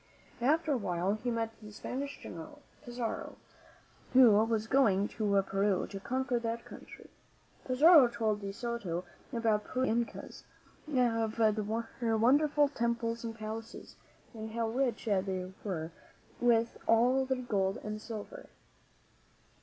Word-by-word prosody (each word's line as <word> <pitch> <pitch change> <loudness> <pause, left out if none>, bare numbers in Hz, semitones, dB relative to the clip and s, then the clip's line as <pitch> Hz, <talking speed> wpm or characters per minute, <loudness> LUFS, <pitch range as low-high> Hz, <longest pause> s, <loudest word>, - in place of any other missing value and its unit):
After 310 +5 +2
a 275 - +2
while 185 -2 -1
he 215 +3 -3
met 230 -1 -1
the 210 -1 -10
Spanish 275 +6 -5
General, 175 - -9 0.2
Pizarro, 240 -3 -4 0.8
who 255 -3 +8
was 220 +1 +2
going 215 -6 +3
to 200 -3 +1
Peru 195 0 0
to 195 - -7
conquer 255 +3 -1
that 230 0 -4
country, - - -12 0.5
Pizarro 285 +2 +7
told 220 -3 -1
De 200 0 -4
Soto 205 -6 -4 0.3
about 225 -4 +1
Peru 255 +4 -2
and 235 -2 +1
the - - -13
Incas, - - -10 0.5
of 230 -4 +1 0.7
their 225 -2 +2
wonder 270 +7 +4
ful 290 0 +3
temples 235 -3 -2
and 225 -1 -5
palaces, 220 +1 -7 0.4
and 220 -1 -7
how 230 -1 -1
rich 245 -1 -1
they 190 -3 -1
were 170 -5 -3 0.5
with 230 -1 +2
all 245 +4 +4
their 260 0 -1
gold 195 -5 0
and 215 0 -5
silver. 220 -2 -8
230 Hz, 140 wpm, -31 LUFS, 210-245 Hz, 0.8 s, who